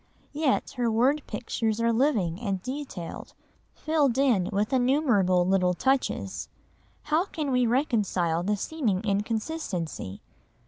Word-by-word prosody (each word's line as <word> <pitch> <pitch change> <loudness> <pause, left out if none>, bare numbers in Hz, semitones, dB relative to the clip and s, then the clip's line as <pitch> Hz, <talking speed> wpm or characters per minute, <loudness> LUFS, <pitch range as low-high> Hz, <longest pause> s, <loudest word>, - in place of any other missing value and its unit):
Yet 295 -2 0
her 240 -1 +1
word 255 +7 +2
pictures 225 -2 -2
are 230 0 +2
living 220 - +1
and 195 -5 -1
detailed, 255 - -6 0.4
filled 295 -6 +1
in 245 -10 +3
with 210 +5 0
innumerable 245 - +3
little 180 -1 +2
touches. 265 +6 -1 0.5
How 310 +4 +1
can 305 -7 -3
we 250 -1 +3
reconcile 210 - +1
the 205 +3 0
seeming 220 -7 -1
inconsistency? 205 - -3
230 Hz, 120 wpm, -27 LUFS, 195-275 Hz, 0.5 s, in